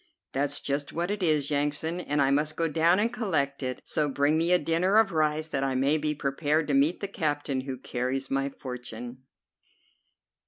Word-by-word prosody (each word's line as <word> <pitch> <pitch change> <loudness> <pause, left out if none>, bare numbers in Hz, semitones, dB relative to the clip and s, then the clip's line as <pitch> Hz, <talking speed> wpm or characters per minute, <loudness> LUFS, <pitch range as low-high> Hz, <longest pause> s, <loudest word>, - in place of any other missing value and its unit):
"That's 145 +1 -1
just 140 0 -2
what 175 +4 -2
it 205 -1 -3
is, 155 -4 +1
Yansan, 150 +4 -1
and 145 -4 +1
I 135 - +2
must 150 +2 +1
go 165 - +1
down 165 +3 +3
and 225 +3 +1
collect 155 - -1
it; 130 -1 -4
so 150 -1 0
bring 145 +2 +2
me 165 +2 +2
a 180 - +7
dinner 175 +5 +2
of 220 -3 +4
rice, 155 -1 +1
that 135 -3 -1
I 135 -1 0
may 140 +4 +2
be 150 0 -1
prepared 145 +2 0
to - - +2
meet 145 +6 +3
the 200 - -2
captain 145 -7 -1
who 130 -1 -5
carries 130 +2 -3
my 135 0 0
fortune." 125 -2 -7
145 Hz, 195 wpm, -27 LUFS, 135-165 Hz, -, a